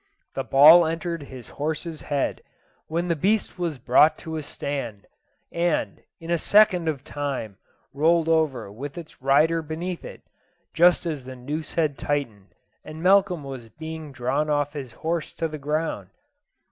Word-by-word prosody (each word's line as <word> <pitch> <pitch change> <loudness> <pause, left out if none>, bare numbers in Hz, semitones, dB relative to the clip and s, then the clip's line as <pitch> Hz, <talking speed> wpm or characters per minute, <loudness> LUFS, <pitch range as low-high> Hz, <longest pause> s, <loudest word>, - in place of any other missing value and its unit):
The - - -2
ball 160 +5 +8
entered 165 0 -3
his 130 -4 -11
horse's 160 +1 -3
head, 145 -2 -2 0.5
when 170 +2 -2
the 170 - +1
beast 195 +3 0
was 170 -5 -2
brought 130 +5 +4
to 160 -1 -4
a 155 - -2
stand, 135 -8 -5 0.5
and, 170 -1 -1 0.2
in 165 0 -6
a 170 - +2
second 185 -3 +4
of 145 -4 -2
time, 140 -10 -4 0.4
rolled 160 +3 +3
over 150 -10 +1
with 140 +9 -8
its 165 -6 -10
rider 150 +5 +3
beneath 165 +3 -5
it, - - -10 0.5
just 175 +2 +4
as 150 -6 -4
the 130 0 -8
noose 145 +5 -6
had 150 -6 0
tightened, 120 -10 -3 0.3
and 155 +1 -9
Malcolm 185 -4 +4
was 130 -4 -8
being 160 +1 -8
drawn 130 +4 -1
off 145 0 0
his 135 -5 -6
horse 165 -1 -1
to 165 - -2
the 155 -1 -7
ground. 155 +3 -2
155 Hz, 160 wpm, -24 LUFS, 140-165 Hz, 0.5 s, ball